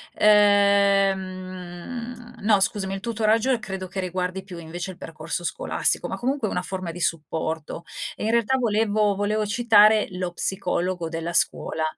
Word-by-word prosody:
Ehm, 200 +2 +1
no 210 -1 +3
scusami 195 0 0
il - - -5
tutoraggio, 225 +2 +1
ehm, 240 - +1
credo 190 -4 -6
che 190 +1 -6
riguardi 185 +1 -3
più, 185 -3 -10
invece, 170 +3 -6
il 180 - -13
percorso 165 0 -5
scolastico, 170 - 0
ma - - -4
comunque 260 -2 -1
è - - -4
una 180 - -2
forma 185 -2 -5
di 175 - -9
supporto, 160 0 -3 0.3
e - - -7
in 220 - +1
realtà 235 +3 +2
volevo 215 -3 +1
volevo 210 +1 0
citare 215 -1 +5
lo 180 -1 -4
psicologo 180 -2 -1
della 165 +1 -4
scuola. 160 -1 +2
195 Hz, 155 wpm, -24 LUFS, 180-215 Hz, 0.3 s, citare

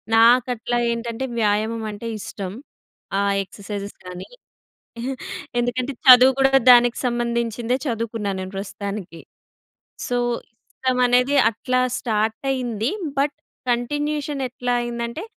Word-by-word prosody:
నాకట్ల 240 +1 +4 0.2
ఏంటంటే, 235 +2 -3
వ్యాయామం 220 +2 +1
అంటే 220 +3 -7
ఇష్టం. 200 -4 -6 0.7
ఆ - - +2 0.2
ఎక్సర్సైజెస్ 200 +1 -7
కానీ, 180 0 -8 1.3
ఎందుకంటే 245 +3 -1
చదువు 255 +1 +9
కూడా 270 0 +4 0.2
దానికి 240 -1 +6
సంబంధించిందే 235 0 -1
చదువుకున్నాను 225 -5 -2
నేను 185 - -7
ప్రస్తుతానికి. 195 -3 -6 0.9
సో, 245 - 0 0.6
ఇష్టం 255 -1 -1
అనేది 250 +3 +3 0.2
అట్లా 255 +3 -1 0.2
స్టార్ట్ 220 -1 0
అయింది. 245 -3 -1 0.3
బట్ 285 +1 +1 0.3
కంటిన్యూయేషన్ 290 +3 -1
ఎట్లా 245 0 -2
అయిందంటే, 235 - -4
235 Hz, 100 wpm, -22 LUFS, 215-250 Hz, 1.3 s, చదువు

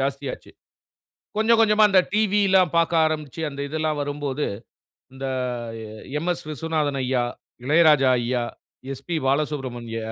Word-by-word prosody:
ஜாஸ்தியாச்சு. 135 0 -4 0.9
கொஞ்சம் 220 +1 +4
கொஞ்சமா 215 -1 +4
அந்த 195 -2 +6
டிவிலாம் 200 -4 +3
பார்க்க 165 -1 +3
ஆரம்பிச்சு 155 0 -4
அந்த 140 0 -8
இதெல்லாம் 155 0 -1
வரும்போது, 145 0 -3 0.7
அந்த 135 0 -6 0.9
எம்.எஸ். 175 +2 -2
விஸ்வநாதன் 150 -2 -1
ஐயா, 125 -1 +1 0.4
இளையராஜா 150 -3 +5
ஐயா, 120 0 -1 0.5
எஸ்பி 135 +6 -5
பாலசுப்ரமணிய 130 -5 -2
150 Hz, 105 wpm, -23 LUFS, 135-170 Hz, 0.9 s, அந்த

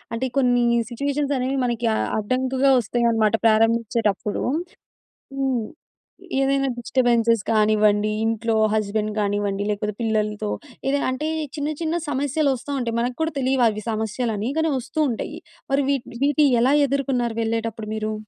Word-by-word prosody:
అంటే, 260 +3 -1
కొన్నీ 245 -2 +3 0.3
సిచ్యువేషన్సనేవి 275 0 -1
మనకి 240 -1 -1
ఆహ్, - - -1
అడ్డంకుగా 260 +4 +1
ఒస్తాయనమాట 225 -1 +1
ప్రారంభిచ్చేటప్పుడు. 225 -2 +1 0.9
హ్మ్. 260 -4 0 0.7
ఏదైనా 275 0 +2
డిస్టర్బెన్సెస్ 235 -2 +2
కానివ్వండి, 215 -1 +3
ఇంట్లో 225 0 0 0.2
హస్బెండ్ 215 0 -1
గానివ్వండి, 205 -1 -1
లేకపోతే 210 0 -2
పిల్లలతో 215 -1 -1 0.4
ఏదైనా, 280 +1 +1
అంటే, 260 +4 -3 0.3
చిన్న 295 -1 -2
చిన్న 325 0 -1
సమస్యలొస్తా 285 -1 0
ఉంటాయి. 230 -2 -2
మనకు 245 +1 -2
కూడా 320 0 0
తెలీవవి 245 -5 +1
సమస్యలని, 220 0 -2
కానీ 320 0 +2
ఒస్తూ 260 +5 -3
ఉంటయ్యి. 230 - -5 0.3
మరి 280 0 +3
వీటిని 270 -4 -2
వీటియి 290 -1 +3
ఎలా 260 +4 +4
ఎదుర్కున్నారు 260 -4 -1
వెళ్ళేటప్పుడు 225 -1 -2
మీరు? 215 0 -2
235 Hz, 120 wpm, -23 LUFS, 215-270 Hz, 0.9 s, ఎలా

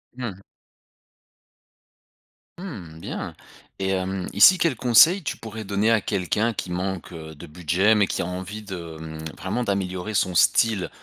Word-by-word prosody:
Mmh. 115 -7 -5 2.2
Mmh 95 - -8
bien! - - -6 0.4
Et 95 -1 -1
mmh, 95 -1 -4
ici 185 -1 +8
quels 165 -6 +1
conseils 130 - +6
tu 145 - -4
pourrais 110 -1 -7
donner 100 +2 +1
à 115 -2 +3
quelqu'un 105 +6 0
qui 90 -3 -5
manque, 90 0 -3
heu, 80 -2 -9
de 80 - -11
budget 90 +6 +1
mais 105 -3 +3
qui - - -2
a - - -4
envie 95 +4 -6
de, 85 -5 -7
mmh, 80 0 -8 0.2
vraiment 95 +7 -2
d'améliorer 100 -1 -2
son 95 -2 +1
style 105 +2 +3
95 Hz, 150 wpm, -24 LUFS, 90-110 Hz, 2.2 s, ici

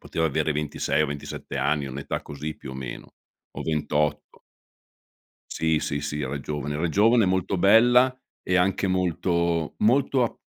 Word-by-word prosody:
poteva 80 0 -1
avere 75 +1 0
26 75 0 0
o 75 - +1
27 70 0 -6
anni, 75 -1 0
un'età 70 +1 -4
così 75 +2 -6
più 65 - -9
o 65 - -8
meno, 65 -2 -8 0.4
o - - -6
28. 75 -1 -1 1.1
Sì, 80 -1 +1
sì, 70 -1 -2
sì, 75 +1 -3
era 70 0 -3
giovane 75 0 -4
era 85 +3 -1
giovane, 110 +5 +4
molto 95 +1 0
bella, 120 +7 +5 0.3
e 95 - +1
anche 95 +2 +2
molto 85 -3 0
molto 130 +3 +3
ap 120 - -2
80 Hz, 155 wpm, -25 LUFS, 75-95 Hz, 1.1 s, bella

